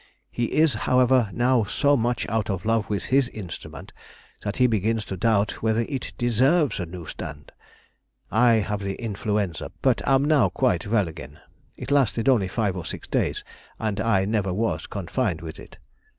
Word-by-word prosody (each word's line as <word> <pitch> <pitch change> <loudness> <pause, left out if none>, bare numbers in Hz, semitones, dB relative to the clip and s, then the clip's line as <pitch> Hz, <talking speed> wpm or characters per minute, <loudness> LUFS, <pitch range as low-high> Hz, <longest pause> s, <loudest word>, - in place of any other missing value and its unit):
He 120 - -1
is, 155 +4 +3 0.2
however, 125 -3 +4
now 120 +1 +2
so 140 +7 +2
much 120 -1 0
out 110 0 -1
of 95 0 -3
love 115 -2 +1
with 105 -2 -2
his 135 -2 +4
instrument 100 -8 -9 0.5
that 100 0 -3
he 125 - +4
begins 110 -1 +1
to 95 - -5
doubt 105 +1 +1
whether 110 0 +1
it 135 -3 -4
deserves 130 +4 +2
a 90 - -3
new 85 0 -8
stand. - - -8 0.8
I 120 +2 +5
have 105 -2 0
had 100 - -4
the 95 - -3
influenza, 105 -5 -2
but - - +3
am 135 +1 +4
now 150 -4 +4
quite 130 -3 0
well 105 -3 +2
again. 75 -2 -10 0.4
It - - -6
lasted 130 -5 +2
only 120 -8 +4
five 100 0 -1
or 90 - -5
six - - -7
days, - - -1 0.3
and 110 -2 -2
I 105 -4 +2
never 100 -2 0
was 110 +5 -1
confined 95 -2 -2
with 80 -1 -8
it.... - - -13
110 Hz, 180 wpm, -24 LUFS, 100-125 Hz, 0.8 s, I